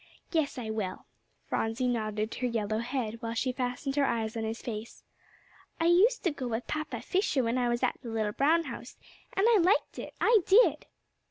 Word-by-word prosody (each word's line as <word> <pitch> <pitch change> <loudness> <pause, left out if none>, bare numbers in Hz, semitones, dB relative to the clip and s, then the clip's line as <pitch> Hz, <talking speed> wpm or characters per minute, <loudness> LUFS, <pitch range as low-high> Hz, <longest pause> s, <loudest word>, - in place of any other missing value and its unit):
"Yes, 315 -5 0
I 225 -3 -4
will." 210 -4 -4 0.4
Phronsie 225 +3 -1
nodded 215 -2 -1
her 250 - -1
yellow 215 -2 -1
head, 235 -2 -3
while 230 0 -3
she 255 +2 0
fastened 255 +2 -3
her 285 - +4
eyes 225 -2 -1
on 225 - -2
his 220 +1 -3
face. 220 -1 -7 0.8
"I 330 - +1
used 390 +8 +4
to 350 - +2
go 270 -4 -5
with 230 +1 -3
Papa 310 0 -4
Fisher 365 -8 +1
when 235 +2 0
I 245 -1 +1
was 240 0 -1
at - - 0
the 235 - -7
little 220 -2 -1
brown 315 +9 +3
house, - - -8 0.4
and 390 - +2
I 460 -3 +6
liked 370 +5 +2
it; - - -7
I 460 -2 +5
did." 440 +6 +5
245 Hz, 195 wpm, -29 LUFS, 225-310 Hz, 0.8 s, I